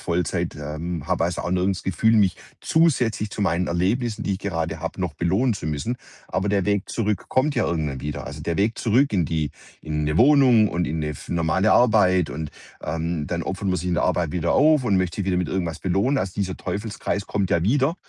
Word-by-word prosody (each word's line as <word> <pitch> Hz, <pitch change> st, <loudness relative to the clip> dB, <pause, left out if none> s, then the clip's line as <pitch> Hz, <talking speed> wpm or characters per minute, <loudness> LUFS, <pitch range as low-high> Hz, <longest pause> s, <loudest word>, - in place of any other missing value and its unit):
Vollzeit, 85 Hz, -1 st, -1 dB
ähm, 75 Hz, +2 st, -5 dB
habe, -, -, +1 dB
also, 85 Hz, +1 st, -2 dB
auch 85 Hz, -, -3 dB
nirgends 95 Hz, +1 st, 0 dB
'n -, -, -29 dB
Gefühl, 110 Hz, +6 st, +2 dB
mich 100 Hz, -4 st, +3 dB, 0.2 s
zusätzlich 125 Hz, -10 st, +2 dB
zu 105 Hz, -, -3 dB
meinen 90 Hz, -2 st, +1 dB
Erlebnissen, 110 Hz, +6 st, 0 dB
die 100 Hz, -, 0 dB
ich 95 Hz, -, -2 dB
gerade 85 Hz, -5 st, -3 dB
habe, -, -, -5 dB
noch 90 Hz, -4 st, -1 dB
belohnen 95 Hz, -, +1 dB
zu 90 Hz, -, -6 dB
müssen. 80 Hz, -, -2 dB, 0.3 s
Aber 100 Hz, -, -2 dB
der 100 Hz, -2 st, +1 dB
Weg 100 Hz, -1 st, 0 dB
zurück 105 Hz, -4 st, -2 dB
kommt 140 Hz, +3 st, +1 dB
ja 120 Hz, -, +1 dB
irgendwann 75 Hz, -6 st, -2 dB
wieder. 75 Hz, 0 st, -5 dB
Also, 75 Hz, +1 st, -7 dB
der 85 Hz, +1 st, -2 dB
Weg 105 Hz, +3 st, +1 dB
zurück 125 Hz, +4 st, +2 dB
in 90 Hz, -5 st, +2 dB
die 80 Hz, -3 st, -1 dB, 0.3 s
in 75 Hz, -1 st, -2 dB
'ne 75 Hz, +1 st, 0 dB
Wohnung 125 Hz, -, +6 dB
und 85 Hz, -2 st, -1 dB
in 80 Hz, +1 st, -2 dB
'ne 75 Hz, -, -2 dB
f 75 Hz, -, -9 dB
normale 85 Hz, +5 st, +2 dB
Arbeit. 95 Hz, -8 st, +4 dB
Und, 75 Hz, -1 st, -5 dB, 0.3 s
ähm, 80 Hz, 0 st, -2 dB
dann 85 Hz, -1 st, -2 dB
opfert 95 Hz, +3 st, -3 dB
man 90 Hz, -, +1 dB
sich 90 Hz, +2 st, -3 dB
in 90 Hz, -, +1 dB
der -, -, +1 dB
Arbeit 85 Hz, -3 st, 0 dB
wieder 85 Hz, -1 st, 0 dB
auf 150 Hz, -1 st, +4 dB
und 100 Hz, -5 st, +2 dB
möchte 90 Hz, -2 st, -1 dB
sich 100 Hz, -2 st, -2 dB
wieder 90 Hz, -2 st, +1 dB
mit 90 Hz, -, -1 dB
irgendwas 85 Hz, -4 st, -2 dB
belohnen. 100 Hz, +10 st, +1 dB
Also, 95 Hz, -1 st, -2 dB
dieser 95 Hz, -2 st, -2 dB
Teufelskreis 100 Hz, +1 st, -3 dB
kommt 100 Hz, -3 st, -1 dB
ja 85 Hz, -, +2 dB
wieder. 135 Hz, -, +2 dB
95 Hz, 225 wpm, -23 LUFS, 85-110 Hz, 0.3 s, Wohnung